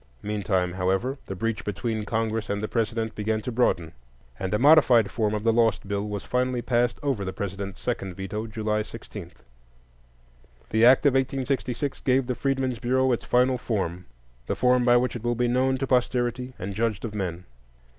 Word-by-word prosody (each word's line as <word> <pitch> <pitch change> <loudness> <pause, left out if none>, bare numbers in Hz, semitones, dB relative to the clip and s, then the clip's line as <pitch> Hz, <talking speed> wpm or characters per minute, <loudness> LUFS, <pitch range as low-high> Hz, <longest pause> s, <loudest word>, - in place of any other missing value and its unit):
Meantime, 100 -4 -1
however, 95 +9 -1
the 95 - -4
breach 105 0 -2
between 110 +1 -3
Congress 110 -1 -1
and 100 - -1
the - - 0
President 115 -1 -1
began 110 +1 -1
to 115 +4 -5
broaden, 90 -9 +1 0.5
and 95 -1 -3
a 105 - +2
modified 130 -6 +6
form 110 -2 0
of 105 - -3
the 115 0 +3
lost 115 -3 +2
bill 100 +1 -2
was 100 -1 -4
finally 125 0 0
passed 120 -1 +1
over 135 -8 0
the 95 - -3
President's 100 0 -5
second 95 -7 -3
veto, 105 +4 -4
July 105 0 -1
16. 105 -4 -9 1.4
The 110 +1 +3
act 130 +4 +6
of 140 - +5
1866 135 0 -1
gave 130 0 +2
the 125 - -1
Freedmen's 130 -2 -1
Bureau 130 +2 +2
its 120 - -1
final 125 +1 +2
form,—the 85 - -5
form 125 -1 +3
by 120 0 +6
which 125 +1 0
it 120 - -6
will 120 0 0
be 120 +1 +1
known 130 +2 +2
to 135 - -1
posterity 125 0 0
and 95 +2 -5
judged 110 0 -1
of 110 - -5
men. 90 -4 -4
115 Hz, 180 wpm, -26 LUFS, 100-125 Hz, 1.4 s, modified